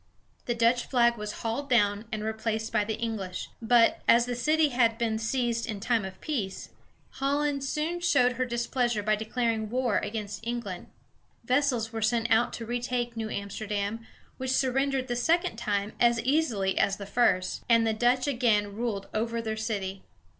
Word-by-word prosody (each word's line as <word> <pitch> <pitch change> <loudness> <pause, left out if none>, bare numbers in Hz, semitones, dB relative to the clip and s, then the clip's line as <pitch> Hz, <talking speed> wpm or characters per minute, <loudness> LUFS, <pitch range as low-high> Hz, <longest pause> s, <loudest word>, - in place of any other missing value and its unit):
The 240 - -1
Dutch 235 +1 +2
flag 235 -2 +3
was 210 -2 -5
hauled 235 +5 -2
down 205 -3 +2
and 215 -1 -3
replaced 220 0 -2
by 215 -2 +3
the 220 +1 -2
English; 215 -6 -4
but, 235 0 +4
as 235 0 +6
the 245 - -3
city 305 +6 +2
had 235 -3 +2
been 225 -2 0
seized 230 0 -1
in 210 -2 -4
time 230 -1 0
of 190 0 -8
peace, 220 -11 -3 0.5
Holland 280 0 0
soon 305 +5 -2
showed 285 -8 +3
her 255 +1 -1
displeasure 240 -2 -1
by 215 +1 +2
declaring 220 0 -1
war 245 -2 +1
against 210 -1 -5
England. 230 -6 -4 0.6
Vessels 250 -3 +1
were 225 - -3
sent 230 +1 +1
out 225 +2 +4
to 230 - -5
retake 240 0 -2
New 220 -1 -3
Amsterdam, 205 +2 -3 0.3
which 260 0 -4
surrendered 265 0 +1
the 240 - -2
second 320 -1 +1
time 205 -2 -1
as 235 -1 +4
easily 245 -9 +1
as 195 - +2
the 200 - -7
first, 185 -4 +1
and 230 -1 +5
the 220 - +1
Dutch 245 +3 +2
again 225 -7 +1
ruled 215 -4 -3
over 230 +2 -1
their 220 -1 -3
city. 200 -3 -3
230 Hz, 170 wpm, -28 LUFS, 215-245 Hz, 0.6 s, as